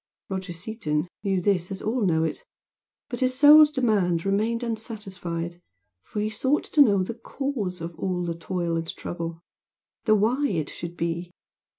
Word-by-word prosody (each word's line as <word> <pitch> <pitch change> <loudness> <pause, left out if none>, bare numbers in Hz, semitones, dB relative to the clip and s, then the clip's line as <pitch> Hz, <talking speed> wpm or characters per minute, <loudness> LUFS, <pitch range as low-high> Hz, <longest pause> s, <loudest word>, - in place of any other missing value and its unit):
Roger 190 -1 -4
Seaton 170 -4 -2
knew 195 -2 +1
this 180 -1 +1
as 195 -1 -4
all 225 +2 -1
know 160 -2 +2
it 165 - -3 0.6
but 245 - -5
his 255 0 +2
soul's 295 +2 +9
demand 205 - +1
remained 220 +4 +1
unsatisfied, 190 -7 -5 0.4
for 210 - -4
he 215 - 0
sought 260 +7 +1
to 300 - +3
know 200 -8 +5
the 210 - -4
CAUSE 230 -6 -4
of 170 +1 -5
all 180 -2 -1
the 170 - -1
toil 170 0 -2
and 165 0 -4
trouble, 170 -1 -5 0.6
the 215 - +5
"why" 245 +8 +2
it 160 - -1
should 170 0 -7
be. 170 +1 -2
195 Hz, 165 wpm, -26 LUFS, 170-230 Hz, 0.6 s, soul's